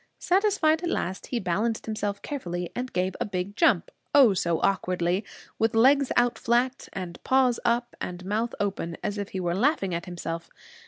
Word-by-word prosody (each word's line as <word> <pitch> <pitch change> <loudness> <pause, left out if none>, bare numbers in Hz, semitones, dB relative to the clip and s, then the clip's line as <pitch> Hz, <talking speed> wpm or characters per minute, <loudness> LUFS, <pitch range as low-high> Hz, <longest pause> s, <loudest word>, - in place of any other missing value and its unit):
Satisfied 365 -5 +2
at 345 - -2
last, 190 - -3
he 245 - -1
balanced 210 +5 -1
himself 205 -2 -3
carefully 175 -11 -4
and 255 +1 -3
gave 185 +1 -1
a - - +1
big 195 0 -4
jump 235 - +3 0.2
Oh, 260 -8 +7
so 170 -3 0
awkwardly! 180 0 +1 0.4
with 225 +1 +2
legs 270 +4 +5
out 240 -1 +2
flat, 245 +3 0
and 180 -3 -7
paws 260 -2 +3
up, 240 0 0
and 180 0 -5
mouth 220 +4 -1
open 195 -4 -2
as 205 0 -2
if 200 - -4
he 190 - -4
were 175 -1 -1
laughing 200 - +1
at 170 +1 -3
himself. 170 -1 -5
205 Hz, 175 wpm, -26 LUFS, 180-250 Hz, 0.4 s, Oh